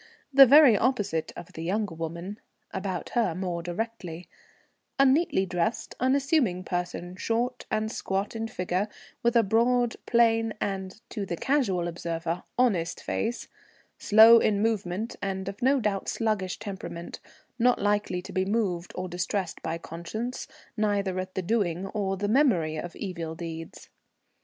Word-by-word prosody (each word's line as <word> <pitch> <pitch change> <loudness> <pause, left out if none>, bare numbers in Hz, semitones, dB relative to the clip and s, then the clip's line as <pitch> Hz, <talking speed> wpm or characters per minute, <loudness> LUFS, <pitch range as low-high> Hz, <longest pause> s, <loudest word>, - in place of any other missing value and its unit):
The 270 0 +10
very 280 -3 +8
opposite 205 -8 0
of 175 - -10
the 160 - -7
younger 200 +2 -1
woman 170 +5 -6 0.3
(about 190 -2 -4
her 225 -9 +1
more 180 -2 -3
directly), 175 -2 -5 0.7
a 275 - +6
neatly 270 - +3
dressed 180 +4 -2
unassuming 260 - +2
person, 175 0 -4
short 240 +4 -1
and 220 0 -1
squat 195 +1 -2
in 225 0 -2
figure, 185 0 -1 0.3
with 235 +1 +2
a 230 - +6
broad, 235 +3 +2
plain, 225 -1 +3
and, 190 0 -3
to 210 - -3
the 175 -3 -4
casual 200 - +1
observer, 170 0 -3 0.2
honest 185 -10 +1
face, 235 +2 -3 0.5
slow 225 +2 +8
in 210 -3 +2
movement 215 -1 -1
and 190 -1 -3
of 195 0 -6
no 270 +2 +4
doubt 205 -4 -1
sluggish 215 -5 -1
temperament, 190 -4 -7 0.4
not 245 +1 +4
likely 205 -3 0
to - - -9
be 185 - +1
moved 190 -4 -1
or 185 0 -3
distressed 180 +1 -3
by 160 +1 -3
conscience, 170 +10 -5 0.3
neither 200 -3 0
at 185 0 -6
the 190 - -1
doing 190 -3 0
or 195 -1 -2
the 205 +2 -1
memory 210 - +3
of 170 +3 -6
evil 170 -5 -5
deeds. 165 -1 -7
195 Hz, 145 wpm, -27 LUFS, 175-225 Hz, 0.7 s, The